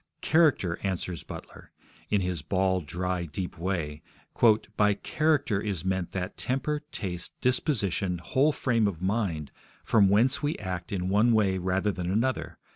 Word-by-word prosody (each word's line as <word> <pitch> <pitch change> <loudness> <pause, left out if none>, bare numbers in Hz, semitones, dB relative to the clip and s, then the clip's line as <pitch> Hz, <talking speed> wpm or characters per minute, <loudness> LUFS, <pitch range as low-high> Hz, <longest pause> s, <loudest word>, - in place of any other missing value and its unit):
'Character,' 145 - +3
answers 90 -3 -3
Butler, - - -10 0.4
in 105 -2 +2
his 90 -4 -2
bald, 95 +1 0
dry, 90 +2 -2
deep 85 +2 -5
way, 85 -5 -2 0.7
'by 105 -1 +3
character 145 -4 +1
is 100 -5 -3
meant 95 -2 -1
that 95 0 -4
temper, 140 +4 -1
taste, 90 -3 -5
disposition, 105 - 0
whole 130 - +2
frame 115 -7 +1
of 90 -6 -3
mind 95 -6 -1 0.3
from 100 -4 +4
whence 120 +8 +3
we 150 +1 -1
act 90 -3 -5
in 90 -2 -1
one 105 +5 +4
way 100 -4 +2
rather 95 +3 0
than 90 -2 -4
another 120 +6 -1
95 Hz, 145 wpm, -28 LUFS, 90-115 Hz, 0.7 s, from